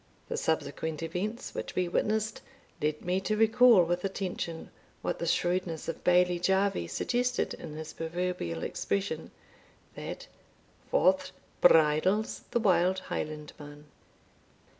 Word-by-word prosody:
The - - -2
subsequent 160 0 -2
events 200 +9 -4
which - - -5
we 180 -1 +1
witnessed 215 +4 0 0.4
led 150 0 -1
me 180 +2 +1
to 215 +3 -1
recall 225 -2 +6
with 175 +1 -1
attention 185 -4 -4 0.3
what - - -2
the 170 - -2
shrewdness 175 -1 0
of 165 - -5
Bailie 180 0 +4
Jarvie 190 - +1
suggested 245 - 0
in 155 -2 -8
his 155 0 -7
proverbial 165 - -3
expression, 100 -1 -2 0.6
that - - -7 0.6
"Forth 185 +1 +3 0.3
bridles 165 +6 +4
the 240 - +1
wild 185 -3 +3
Highlandman." 150 -1 -6
180 Hz, 120 wpm, -29 LUFS, 160-195 Hz, 0.6 s, recall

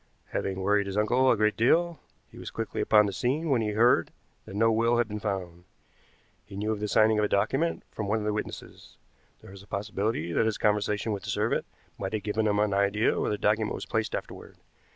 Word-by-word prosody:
Having 95 -1 -3
worried 100 +1 +2
his 100 +1 -4
uncle 125 +5 +3
a - - +4
great 105 0 +2
deal, 170 +8 +2 0.3
he - - -13
was - - -7
quickly - - -4
upon 105 -1 +5
the 100 - -3
scene 140 - -1
when 125 -4 +3
he 105 -1 -1
heard 115 -5 +4 0.4
that 95 - -10
no 115 +2 +3
will 115 +2 +2
had 120 -2 +2
been 105 -1 -5
found. 95 -4 -4 0.8
He 100 0 -12
knew 105 +2 -2
of 110 - -2
the 105 - -2
signing 110 +1 +3
of - - +2
a - - +2
document 135 +12 0
from 105 - -4
one 105 +2 +1
of 110 - -3
the 105 - 0
witnesses. 105 - -7 0.5
There 95 - -12
is 100 - -11
a 100 - -17
possibility 100 -3 -2
that 110 - +2
his 110 - -1
conversation 105 +1 0
with 100 -2 -3
the - - -8
servant - - 0 0.3
might 95 - -4
have 105 -2 -2
given 110 +1 0
him 105 -1 +1
an 105 -1 +1
idea 100 +2 +2
where - - 0
the 105 - -1
document 105 +1 +1
was - - -6
placed - - -1
afterward. - - -8
105 Hz, 230 wpm, -27 LUFS, 100-110 Hz, 0.8 s, upon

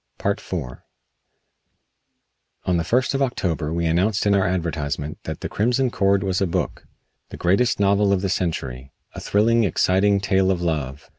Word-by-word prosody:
IV - - -2 2.1
On 90 -1 +1
the 85 - 0
first 125 +11 +1
of 135 - -1
October 85 - -1
we 85 +1 -1
announced 95 +7 +1
in 100 - +3
our 100 -2 +2
advertisement 75 -4 -3
that - - -5
"The - - -3
Crimson 125 +4 0
Cord" 100 -1 +2
was 95 -1 -1
a 95 - +2
book; 85 - -3 0.4
the - - -9
greatest 100 +8 +2
novel 100 0 +3
of 95 -2 +2
the - - +1
century; 65 -8 -3 0.2
a - - -7
thrilling, 115 +3 +2
exciting 100 +2 +2
tale 95 -1 +2
of 95 -2 +1
love. 75 -5 -3
95 Hz, 160 wpm, -22 LUFS, 85-100 Hz, 2.1 s, in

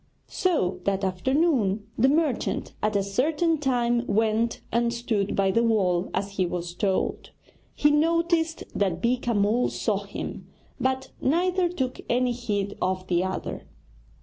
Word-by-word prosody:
So, 310 - 0
that 195 0 0
afternoon, 215 - +1
the 260 +4 +4
merchant 295 -4 0
at 215 0 0
a 200 - +2
certain 300 - +1
time 240 -4 +1
went 220 +2 +1
and 235 0 +2
stood 230 -4 -1
by 195 -1 +2
the 230 - +2
wall 195 -6 +2
as 195 +1 -3
he 185 - +2
was 175 0 -4
told. 190 +1 -1 0.5
He 295 - +4
noticed 330 +1 +1
that 190 -4 0
Beeka 240 +1 0
Mull 210 +4 +2
saw - - -1
him, - - -6 0.3
but 260 0 -1
neither 355 +4 +2
took 260 -7 -3
any 250 +1 +2
heed 205 -5 -2
of 185 0 -1
the 180 -1 +1
other. 190 0 -4
235 Hz, 145 wpm, -26 LUFS, 195-275 Hz, 0.5 s, the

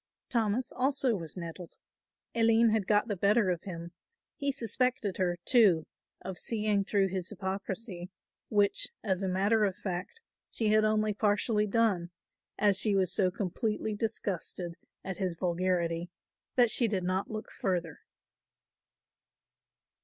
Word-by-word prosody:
Thomas 230 0 0
also 265 -2 +1
was 165 -2 -5
nettled. 170 0 -7 0.6
Aline 230 0 +4
had 215 -3 0
got 210 +2 +3
the 205 - -1
better 200 +1 +3
of 170 -2 -4
him; 170 -2 -6 0.4
he 280 0 -1
suspected 240 -4 -1
her, 175 -2 0
too, 200 -11 +5 0.4
of 185 0 -4
seeing 210 -3 +1
through 195 -1 +1
his 185 -1 -2
hypocrisy; 190 -1 -4 0.4
which, 205 -2 +2 0.2
as 190 -3 0
a 195 - -1
matter 205 +4 +2
of 195 -3 +1
fact, 185 - -5 0.3
she 220 -2 0
had 215 0 +4
only 215 0 +2
partially 210 +1 +1
done, 200 -5 +1 0.5
as 205 -2 +3
she 210 -3 +2
was 185 -2 +2
so 185 -2 +3
completely 210 +3 -2
disgusted 195 -5 -3 0.3
at 190 -2 -5
his 185 -4 -2
vulgarity 175 -1 0 0.5
that 240 -3 +5
she 235 - +3
did 195 -4 -1
not 185 +2 -1
look 215 0 -6
further. 175 -5 -2
200 Hz, 140 wpm, -30 LUFS, 185-220 Hz, 0.6 s, too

